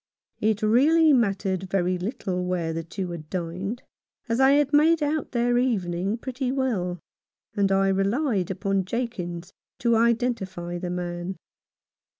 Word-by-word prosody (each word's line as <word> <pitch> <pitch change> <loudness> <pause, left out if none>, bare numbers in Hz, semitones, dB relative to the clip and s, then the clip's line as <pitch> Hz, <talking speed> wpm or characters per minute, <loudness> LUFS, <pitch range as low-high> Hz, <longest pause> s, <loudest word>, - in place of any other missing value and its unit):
It 215 0 +1
really 300 +8 +5
mattered 195 -5 0
very 185 -1 0
little 185 -2 -3
where 175 -3 -1
the 165 0 -3
two 180 +2 -5
had 155 -3 -8
dined, 185 +6 -4 0.4
as 230 +1 0
I 265 +1 +6
had 290 0 +2
made 310 +2 +5
out 295 +1 -1
their 240 0 +2
evening 195 -4 0
pretty 255 +1 -3
well, 220 -10 -1 0.6
and 200 -2 +2
I 195 0 +3
relied 195 - +1
upon 195 0 -1
Jakins 185 -6 -4 0.2
to 235 -1 +2
identify 220 -7 0
the 180 0 -4
man. 175 +1 -4
195 Hz, 140 wpm, -25 LUFS, 180-245 Hz, 0.6 s, I